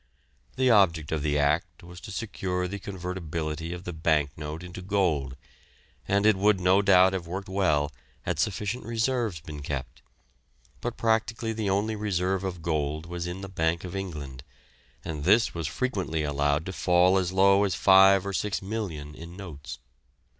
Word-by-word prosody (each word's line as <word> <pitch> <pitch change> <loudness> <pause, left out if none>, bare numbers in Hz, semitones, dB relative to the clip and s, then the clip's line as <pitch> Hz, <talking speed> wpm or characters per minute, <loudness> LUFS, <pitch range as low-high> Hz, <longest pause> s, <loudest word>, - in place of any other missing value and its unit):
The 130 -1 +3
object 85 -8 +3
of 80 -2 -1
the 75 0 0
Act 75 +4 0
was 85 0 -11
to - - -9
secure 95 -4 -3
the 100 +2 -5
convertibility 85 -4 -4
of 90 0 -6
the 90 - -5
bank 80 -3 +1
note 75 +2 -6
into 90 +1 -8
gold, 90 -9 0 0.7
and 100 +1 +2
it 110 -1 +6
would 100 0 +3
no 95 +2 +4
doubt 95 -1 +5
have 90 -3 -3
worked 95 +3 -5
well 75 -7 +1 0.3
had - - -2
sufficient 105 +4 -1
reserves 115 -5 -1
been 75 -2 -8
kept, 70 -2 -5 0.8
but 120 0 -4
practically 115 0 0
the 110 -2 -2
only 105 +3 0
reserve 95 -2 -1
of 90 -3 -4
gold 75 -1 -1
was 85 0 -5
in 90 +2 -5
the 95 - -6
Bank 80 -3 -1
of 90 +1 -6
England, 75 -9 -6 0.6
and 75 -3 -4
this 110 +8 +4
was 80 -3 -3
frequently 90 - -2
allowed 75 +1 0
to 95 - -5
fall 90 +1 +4
as 90 -1 -1
low 100 +1 +5
as 95 -3 0
five 95 +1 +6
or 100 - -3
six 100 0 -1
million 95 -8 -5
in 85 +3 -10
notes. 75 -6 -8
90 Hz, 170 wpm, -27 LUFS, 80-100 Hz, 0.8 s, it